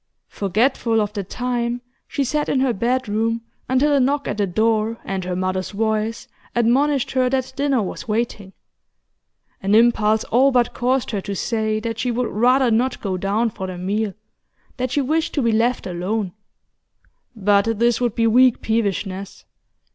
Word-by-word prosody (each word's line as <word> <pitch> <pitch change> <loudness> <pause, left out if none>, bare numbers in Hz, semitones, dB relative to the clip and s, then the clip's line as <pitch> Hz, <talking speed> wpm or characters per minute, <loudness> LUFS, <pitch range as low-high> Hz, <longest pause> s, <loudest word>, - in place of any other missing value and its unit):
Forgetful 225 +3 +1
of 210 -1 -1
the 200 -2 -3
time, 240 +3 -2 0.3
she 280 - -1
sat 295 +3 -1
in 270 - +2
her 260 -2 +2
bedroom 230 0 0 0.3
until 270 +3 +3
a 280 - +4
knock 280 +2 +1
at 210 - -3
the 200 - +2
door, 220 +3 +1
and 190 -1 -3
her 180 0 -2
mother's 185 0 -2
voice, 220 +1 -1 0.3
admonished 260 +4 +2
her 255 -1 +2
that 260 0 -1
dinner 275 -4 +1
was 190 - -6
waiting. 210 -3 -2 1.1
An 195 +2 +2
impulse 220 -2 +4
all 265 +4 +3
but 245 -2 +2
caused 255 0 0
her 205 -3 -2
to 200 +1 -5
say 220 +1 -1
that 230 0 -4
she 250 - 0
would 240 +1 -1
rather 250 +3 +3
not 245 +3 +1
go 195 -3 -2
down 205 +5 0
for 190 -2 -6
the 185 -1 -6
meal, 200 +3 -2 0.6
that 255 0 -1
she 285 - +1
wished 315 +5 -1
to 290 - +1
be 230 - +2
left 230 +3 +1
alone. 185 +2 -2 1.0
But 205 +1 +2
this 235 +1 +2
would 240 -2 0
be 230 - +2
weak 245 +2 +4
peevishness. 200 -3 -2
230 Hz, 170 wpm, -21 LUFS, 205-250 Hz, 1.1 s, a